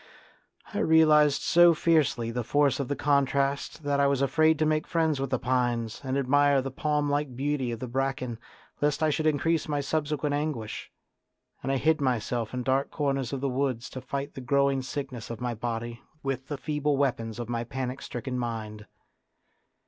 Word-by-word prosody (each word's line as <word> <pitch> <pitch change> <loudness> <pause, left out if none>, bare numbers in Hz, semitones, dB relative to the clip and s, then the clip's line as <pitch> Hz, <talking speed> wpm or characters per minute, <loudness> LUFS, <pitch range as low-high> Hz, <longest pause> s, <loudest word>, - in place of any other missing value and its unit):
I - - -1
realised 155 -2 +5
so 175 -1 +6
fiercely 150 -8 +2
the 125 +1 -2
force 145 +3 +2
of 140 - -2
the 145 - -1
contrast 140 +1 0
that 140 -1 0
I 140 - +4
was 140 -1 +1
afraid 155 +3 +3
to 155 - +1
make 155 0 +1
friends 160 -4 +1
with 135 -1 -2
the 130 - +1
pines 120 -2 -1
and 135 0 -1
admire 140 +1 +3
the 135 0 -3
palm 150 +2 0
like 145 -2 -1
beauty 135 -1 -1
of 115 - -5
the 130 - -5
bracken 130 -2 -2 0.4
lest 145 +1 +1
I 155 - +3
should 155 +2 0
increase 155 +1 +1
my 145 -1 -1
subsequent 150 0 -1
anguish; 145 -7 -3 0.7
and 135 - -2
I 135 - +2
hid 155 +3 +2
myself 120 -3 -1
in 125 -1 -3
dark 135 +2 +1
corners 135 -4 -1
of 135 -2 -3
the 140 - 0
woods 130 -2 -2
to 130 - -6
fight 140 +2 -4
the 135 - -7
growing 140 +1 +2
sickness 130 -3 -6
of 115 -2 -6
my 125 -1 -2
body 120 +1 -4 0.2
with 135 -1 -3
the 145 - -4
feeble 150 0 -1
weapons 115 -5 -1
of 120 -2 -5
my 120 -1 -2
panic 130 +2 -4
stricken 125 +1 -4
mind. 110 -3 -5
135 Hz, 185 wpm, -27 LUFS, 125-145 Hz, 0.7 s, so